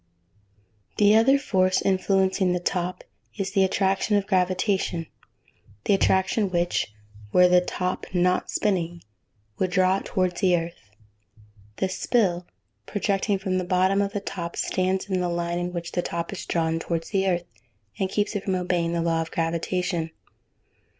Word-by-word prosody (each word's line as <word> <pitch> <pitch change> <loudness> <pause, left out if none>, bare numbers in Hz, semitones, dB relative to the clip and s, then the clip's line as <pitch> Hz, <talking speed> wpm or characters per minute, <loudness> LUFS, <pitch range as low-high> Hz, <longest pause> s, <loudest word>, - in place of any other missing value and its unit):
The 210 0 +5
other 255 +5 +5
force 185 -9 +2
influencing 190 -1 +2
the 180 - 0
top 180 0 -2 0.3
is 195 -2 -2
the 195 -2 +3
attraction 195 +2 +1
of 200 - -1
gravitation: 185 -2 0 0.8
the - - +3
attraction 195 +1 +2
which, 175 - 0 0.4
were 180 0 +6
the 180 0 +5
top 180 +1 -3
not 180 0 +1
spinning, 175 -5 -1 0.6
would 185 - +1
draw 185 +1 +3
it - - -7
towards 185 -1 -1
the 180 -3 +4
earth. 165 -11 -7 0.9
The 190 - 0
"spill" 185 -3 0 0.4
projecting 200 0 0
from 190 -1 -1
the - - -2
bottom 185 +2 +2
of 200 0 -1
the 205 - -1
top 170 -3 -5
stands 185 +1 -1
in 190 -2 0
the 175 - 0
line 170 0 -2
in 175 0 -3
which 170 -1 -5
the 175 - 0
top 170 +1 -4
is 195 - -7
drawn 165 -1 0
towards 165 0 -3
the 195 -2 +1
earth 175 -2 0 0.5
and 190 - 0
keeps 205 +2 -1
it 200 - -2
from 190 - 0
obeying 175 -2 0
the 170 -1 0
law 165 -1 +1
of 165 - -4
gravitation. 170 +1 -1
185 Hz, 160 wpm, -25 LUFS, 175-195 Hz, 0.9 s, were